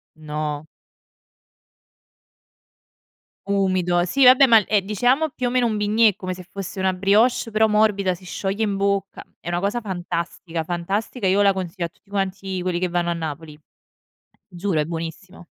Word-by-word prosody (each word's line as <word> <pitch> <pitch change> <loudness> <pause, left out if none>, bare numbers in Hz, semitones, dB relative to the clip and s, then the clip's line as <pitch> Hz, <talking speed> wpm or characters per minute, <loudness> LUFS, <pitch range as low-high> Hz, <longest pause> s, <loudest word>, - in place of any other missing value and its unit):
No. 150 -1 -5 2.8
Umido. 185 -3 +1
Si 255 +9 +4
vabbè, 255 +2 +8
ma 225 -4 +6
è 210 -2 +2
diciamo 245 +10 +1
più 255 -3 -3
o - - 0
meno 250 0 +2
un 220 -2 0
bignè, 210 0 +3
come 185 -1 -5
se 180 0 -10
fosse 195 0 -6
una 190 0 +1
brioche 210 +6 +2
però 220 +1 +3
morbida, 210 -3 +2
si 180 +1 -13
scioglie 195 +3 -2
in 205 -2 0
bocca, 200 0 -1 0.2
è - - -13
una 175 0 0
cosa 205 +6 -1
fantastica 175 -3 -4
fantastica, 195 +7 -3
io 195 +2 +3
la 200 -1 +4
consiglio 180 -1 -4
a - - -5
tutti 195 - -33
quanti 195 -1 -3
quelli 180 -1 -1
che 180 0 -1
vanno 175 0 0
a - - +1
Napoli. 155 -2 -6 0.9
Giuro, 180 -2 -1
è - - 0
buonissimo 165 +3 -7
190 Hz, 160 wpm, -22 LUFS, 175-210 Hz, 2.8 s, vabbè